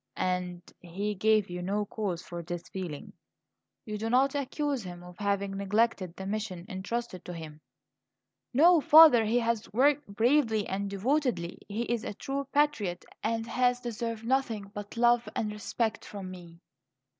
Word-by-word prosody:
"And 180 -1 -2 0.2
he 195 +4 -3
gave 215 +1 +3
you 180 0 -5
no 205 +3 -1
cause 195 -5 -3
for 175 -1 -6
this 175 0 -6
feeling? 175 -7 -6 0.7
You 210 -1 -4
do 225 +1 -2
not 265 +3 +3
accuse 285 -1 -1
him 175 -2 -8
of 180 0 -12
having 200 -1 -1
neglected 200 -2 0
the 190 - -7
mission 195 -4 -4
intrusted 195 -1 -4
to 180 - -6
him?" 155 -2 -9 0.9
"No, 330 +5 +6
father; 305 -6 +8
he 225 +3 +2
has 230 -1 -1
worked 280 +6 +3
bravely 225 0 +2
and 200 +1 -3
devotedly; 230 - -1
he 215 +3 -2
is 235 -2 -2
a - - -5
true 275 +3 -4
patriot 230 -12 +1 0.2
and 225 0 -1
has 245 +1 +1
deserved 230 -2 -4
nothing 230 -6 0
but 205 +2 -7
love 240 0 +3
and 215 -1 -1
respect 220 +1 -2
from 195 -3 -7
me." 170 -2 -11
215 Hz, 155 wpm, -29 LUFS, 185-240 Hz, 0.9 s, father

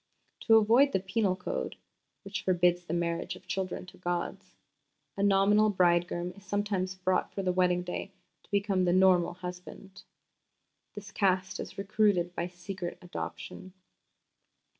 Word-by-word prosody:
To 225 - +7
avoid 235 +6 +5
the - - +3
Penal 190 0 0
Code 185 - -4 0.5
(which 200 +1 -4
forbids 175 -1 +2
the 160 - -6
marriage 170 +2 -2
of 185 - -15
children 185 0 -3
to 180 - -15
gods) 175 -1 -4 0.6
a 200 - -3
nominal 205 +2 +4
bridegroom 175 -2 +1
is 200 - -16
sometimes 200 -2 -1
brought 185 0 0
for 195 - -4
the 185 - +1
wedding 180 -1 +2
day 180 +2 -5 0.3
to - - -27
become 200 -2 +1
the 175 - +2
nominal 185 -2 +4
husband. 180 +2 -9 0.9
This 205 -1 -9
Caste 190 -1 0
is - - -7
recruited 195 -3 +1
by 170 0 -2
secret 180 0 -6
adoption." 180 +1 -7
185 Hz, 140 wpm, -30 LUFS, 180-200 Hz, 0.9 s, To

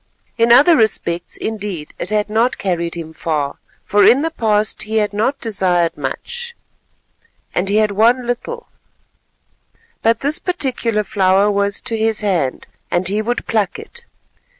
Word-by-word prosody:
In 230 0 +3
other 290 +8 +7
respects, 175 - 0
indeed, 205 -8 -5
it - - -4
had 210 -1 0
not 225 +4 +1
carried 170 -3 -2
him 160 -1 -7
far, 150 -3 -2 0.3
for 205 0 +3
in 270 +5 +6
the 325 - -1
past 215 -6 0
he 220 +1 -1
had 210 -1 +1
not 230 +7 0
desired 185 -6 0
much, 475 - -5 1.0
and 190 +2 -1
he 205 - +1
had 215 -1 +3
won 235 +5 +3
little; 470 - -4 1.4
but 230 0 +2
this 290 +2 +1
particular 250 - -1
flower 195 0 +2
was 200 0 0
to 230 - -3
his 220 0 0
hand, 180 -11 -1 0.2
and 175 +1 +1
he 210 +2 0
would 240 +3 -2
pluck 215 -4 0
it. 460 +2 -12
215 Hz, 150 wpm, -18 LUFS, 190-240 Hz, 1.4 s, other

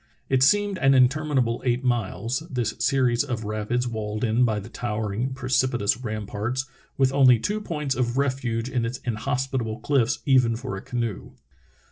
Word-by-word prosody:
It 130 -1 +2
seemed 205 +6 +3
an 135 0 +4
interminable 130 -2 +2
eight 125 0 0
miles, 115 -1 -1
this 125 -6 -1
series 125 0 +2
of 120 -5 -4
rapids 110 +4 -2
walled 110 -1 -4
in 115 +1 +2
by 110 -3 0
the 100 - -9
tow 120 -2 -4
ering, 110 +5 -2
precipitous 130 -5 +1
Ramparts, 110 +2 -3 0.3
with 135 -1 +3
only 130 -4 +6
tv/o 210 - -2
points 150 -8 -2
of 125 -1 -1
refuge 130 -4 -1
in 125 -2 -1
its 115 +2 -3
inhospitable 125 -1 -2
cliffs 135 -2 +1
even 125 -4 +4
for 125 -2 -5
a 95 - -6
canoe. 115 -5 -4
125 Hz, 160 wpm, -25 LUFS, 115-135 Hz, 0.3 s, only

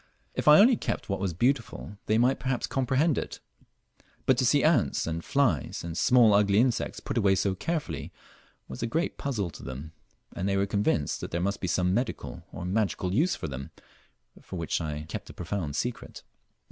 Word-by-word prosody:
If - - -3
I 150 0 +10
only 235 +3 +6
kept - - -3
what 100 - -1
was 95 -2 -1
beautiful, 120 - -1
they 110 - +3
might 125 +3 +3
perhaps 130 -2 -1
comprehend 135 +4 +1
it; - - -6 0.9
but 130 - +4
to 130 - +3
see 140 +3 +4
ants 155 -8 +2
and 85 0 -3
files 120 - 0
and 85 -1 -5
small 120 +1 +5
ugly 100 0 +4
insects 120 +1 +1
put - - -2
away 100 -3 +4
so 95 0 +1
carefully 115 - -3 0.6
was 65 - -8
a 120 - 0
great 165 +10 -2
puzzle 105 - -2
to - - -11
them, 70 +4 -7 0.4
and 95 +3 -1
they 100 - +1
were 100 - +2
convinced 100 -7 0
that - - -5
there 85 - -2
must 100 +3 -1
be 95 - -1
some 90 +1 +1
medical 120 +5 -3
or 90 - -6
magical 95 -1 0
use 160 - +2
for - - -5
them 70 -1 -6 0.8
which 85 -2 -2
I 75 -1 -4
kept - - -6
a - - -9
profound 85 -5 -4
secret. 120 +2 -4
100 Hz, 190 wpm, -28 LUFS, 85-130 Hz, 0.9 s, I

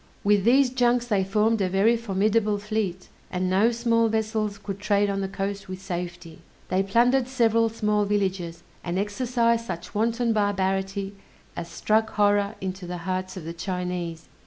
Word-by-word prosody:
With 205 -1 +3
these 255 +2 +5
junks 245 -1 +2
they 205 -5 +1
formed 210 +3 +1
a 185 - +1
very 200 +5 +3
formidable 210 -1 +1
fleet, 205 -3 -3 0.2
and 185 0 -1
no 200 +5 +4
small 230 -1 +2
vessels 220 -2 -1
could 200 -1 -6
trade 205 0 +2
on 195 0 -2
the 195 - -1
coast 195 0 -4
with 185 0 -5
safety. 175 -3 -6 0.3
They 185 - +2
plundered 240 +6 +3
several 230 -3 +2
small 210 -2 0
villages, 190 -4 -1 0.2
and 175 +1 -2
exercised 230 +3 0
such 175 -2 -6
wanton 230 +2 +1
barbarity 195 -1 0 0.4
as 170 - -5
struck 220 +1 +1
horror 205 0 +2
into 185 -1 -5
the 175 0 -5
breasts 185 0 -3
of 180 - -7
the 165 - -5
Chinese. 180 -2 -4
205 Hz, 160 wpm, -25 LUFS, 185-225 Hz, 0.4 s, these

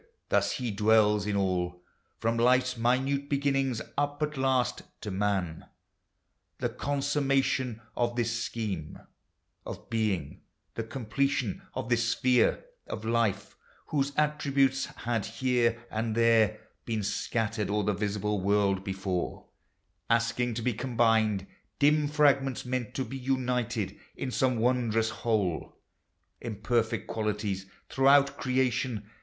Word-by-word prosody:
Thus - - +2
he 125 -4 -2
dwells 105 0 +3
in 105 - 0
all. 90 -2 -1 0.3
From 115 +1 0
life's 125 +2 +3
minute 135 +4 +1
beginnings, 135 -4 +1 0.2
up 145 +1 -1
at 150 0 -2
last 130 -3 +1 0.2
To 105 - -4
man 95 -4 -1 0.5
— - - -50
the - - 0
consummation 135 -4 0 0.2
of 120 0 0
this 115 -1 0
scheme 95 -10 -4 0.7
Of - - -9
being, 105 -10 -1 0.3
the - - -3
completion 130 0 -1
of 115 - -4
this 115 -1 +2
sphere 125 - +2 0.2
Of 110 - -5
life: 115 -3 0 0.3
whose 140 -2 0
attributes 140 -3 +2
had 115 -3 -2
here 115 0 0
and 110 0 -1
there 115 -2 +4 0.2
Been 110 -3 -2
scattered 110 +1 -1
o'er 105 0 +1
the 105 +1 +1
visible 105 0 -1
world 100 -1 +2
before, 95 -2 -3 0.6
Asking 115 +1 +1
to 115 - -3
be 125 - +1
combined, 115 -4 +2 0.3
dim 150 +1 +4
fragments 140 -3 +2
meant 125 -2 -3
To 130 - -1
be 135 +4 -6
united 125 -6 -1 0.2
in 130 - -4
some 130 -1 +1
wondrous 115 -2 +1
whole. 105 -8 -1 0.6
Imperfect 115 0 -1
qualities 105 -3 -2 0.2
throughout 140 +1 +4
creation. 125 -5 0
115 Hz, 125 wpm, -29 LUFS, 105-130 Hz, 0.7 s, there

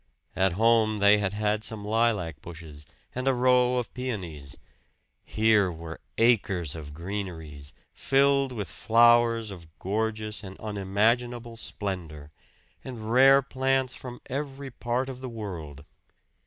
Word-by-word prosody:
At 95 -1 +2
home 110 +1 +3
they 100 +1 +5
had 100 -1 -1
had 105 +1 0
some 110 -2 -5
lilac 105 -9 0
bushes 80 -3 -11 0.3
and 130 +1 -3
a 135 - +3
row 125 0 +3
of 125 - -3
peonies; 90 - -5 0.7
here 110 -4 +3
were 80 0 -8 0.2
acres 100 - +2
of 75 -2 -9
greeneries, 80 -6 -6 0.2
filled 140 0 +2
with 105 -6 -4
flowers 115 -1 +4
of 85 -4 -10
gorgeous 110 +1 -3
and 95 -1 -9
unimaginable 115 +4 0
splendor, 85 -9 -6 0.5
and 115 -4 -6
rare 135 +2 +6
plants 130 -1 0
from 125 -1 -9
every 140 0 -5
part 120 +2 -2
of 130 -1 -7
the 130 - -5
world. 85 - -7
110 Hz, 130 wpm, -27 LUFS, 90-125 Hz, 0.7 s, rare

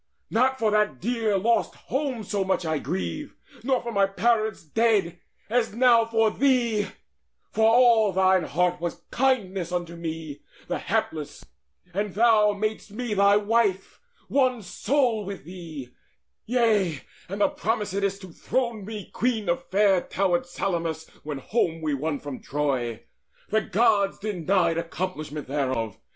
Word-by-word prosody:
Not 260 +3 +2
for 220 -4 +1
that 210 -10 +1
dear 225 -1 0
lost 230 +5 +1
home 265 -4 -3
so 200 0 -1
much 190 -2 0
I 160 -2 0
grieve, 190 - -4 0.3
Nor 260 0 +1
for 235 - -4
my 200 -2 +3
parents 215 +1 0
dead, 190 -1 +1 0.3
as 225 -1 0
now 235 -2 +5
for 225 -1 +2
thee: 240 -6 +2 0.6
For 220 0 +4
all 230 -3 +5
thine 190 -2 +3
heart 180 0 0
was 170 -1 -4
kindness 200 -9 0
unto 175 -1 -3
me 160 -3 -6 0.3
The - - -2
hapless, - - -3 0.5
and 200 0 -2
thou 215 -2 +5
madest 215 +1 -3
me 225 +2 -4
thy 200 0 +5
wife, 210 -2 0 0.3
One 255 -5 +1
soul 235 +3 0
with 195 -1 -7
thee; 160 -7 -8 0.6
yea, 215 - +2 0.3
and 200 +2 -4
thou 285 - +5
promisedst 200 -7 -1
To 185 -3 -10
throne 235 -2 -2
me 210 -1 -7
queen 230 -4 0
of 170 - -1
fair 195 -2 +4
towered 175 -2 0
Salamis, 170 -3 -2
When 150 -2 -5
home 165 - -1
we 155 -2 -1
won 145 +2 -1
from 145 -3 -7
Troy. 130 -6 -2 0.5
The 220 +1 +2
Gods 205 -1 +2
denied 185 -4 +1
Accomplishment 160 -3 -5
thereof. 130 -7 -2
200 Hz, 140 wpm, -25 LUFS, 170-230 Hz, 0.6 s, now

